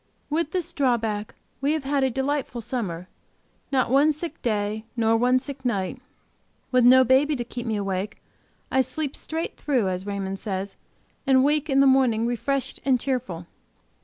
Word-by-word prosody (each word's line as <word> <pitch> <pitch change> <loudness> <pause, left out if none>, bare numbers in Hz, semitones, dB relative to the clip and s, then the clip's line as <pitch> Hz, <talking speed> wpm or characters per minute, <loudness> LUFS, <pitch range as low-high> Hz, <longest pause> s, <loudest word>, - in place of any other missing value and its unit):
With 320 0 0
this 350 0 -3
drawback, 225 -6 0 0.3
we 285 +2 +2
have 315 -3 -2
had 275 0 +1
a 265 - +3
delightful 270 -1 -2
summer; 185 -8 -4 0.6
not 260 -3 +1
one 285 +3 +5
sick 315 +3 -6
day; 215 -1 -1
nor 225 -1 +3
one 250 +2 +3
sick 270 +1 -5
night. 240 +1 -2 0.7
With 255 -1 +4
no 260 +2 +8
baby 270 +4 +3
to 245 - -2
keep 240 0 -7
me 220 - 0
awake, 200 +1 -2 0.5
I 265 - +4
sleep 295 +1 -3
straight 325 +1 -4
through, 250 -10 +1
as 185 +2 -4
Raymond 195 -1 -3
says, 195 -1 -4 0.5
and 260 -1 +5
wake 300 +2 +1
in 270 0 +4
the - - +6
morning 255 -4 +4
refreshed 245 +3 -2
and 260 -2 +3
cheerful. 240 -11 -3
255 Hz, 165 wpm, -25 LUFS, 215-275 Hz, 0.7 s, no